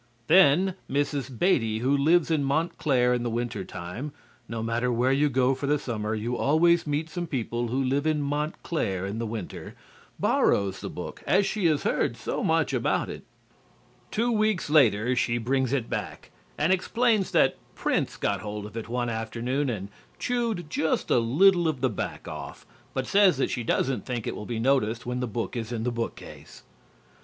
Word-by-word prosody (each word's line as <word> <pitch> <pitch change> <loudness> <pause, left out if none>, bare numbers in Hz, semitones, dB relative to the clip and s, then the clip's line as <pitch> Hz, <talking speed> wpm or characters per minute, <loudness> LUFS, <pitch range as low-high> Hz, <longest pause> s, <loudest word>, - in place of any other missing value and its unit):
Then 180 +3 +5 0.2
Mrs. 140 -2 -1
Beatty, 115 - +2
who 130 +5 +2
lives 160 +4 +3
in 155 -3 +2
Montclair 135 -4 +1
in 120 - 0
the 120 - -1
winter 115 -3 -3
time 90 +13 -7 0.4
(no 115 -1 -3
matter 120 +2 0
where 120 +2 +2
you 145 +2 +3
go 130 0 +2
for 135 +1 -4
the 150 +1 +3
summer, 110 -5 -3
you 115 +3 -2
always 165 +5 +3
meet 150 +2 -1
some 175 +1 -4
people 120 -4 -2
who 130 +4 0
live 140 +4 0
in 155 -1 +2
Montclair 145 - -2
in 100 +3 -4
the 115 - -2
winter), 110 -4 -6 0.4
borrows 100 -1 +2
the - - -5
book, - - -7
as 195 +2 +4
she 195 -2 +1
has 150 -3 +1
heard - - 0
so - - -3
much - - +1
about - - 0
it. - - -9 0.9
Two 235 +3 0
weeks 215 -8 +1
later 125 -5 +4
she 120 -1 +1
brings 130 +2 0
it 130 -5 0
back, - - -5 0.3
and 165 +5 +3
explains 220 +2 +1
that - - +3 0.2
Prince - - -1
got 100 -2 -1
hold 105 0 -5
of 105 - -10
it 115 -1 -5
one 120 0 -1
afternoon 120 +5 -2
and 100 -4 -4 0.3
chewed 230 -9 -1
just 160 +1 -1
a - - +5
little 170 +9 +4
of 155 -5 -1
the 130 -1 +1
back 105 - -5
off, - - -8 0.3
but 130 - -1
says 195 -1 +4
that 135 - 0
she 120 - -2
doesn't 130 +3 0
think 120 -4 -3
it - - -3
will 105 - -7
be 120 - -3
noticed 115 -2 +1
when 125 +1 -2
the 125 - -1
book 115 +3 -4
is 115 -1 -4
in 115 -2 -3
the 125 - 0
bookcase. 115 -1 -7
130 Hz, 185 wpm, -26 LUFS, 115-155 Hz, 0.9 s, Then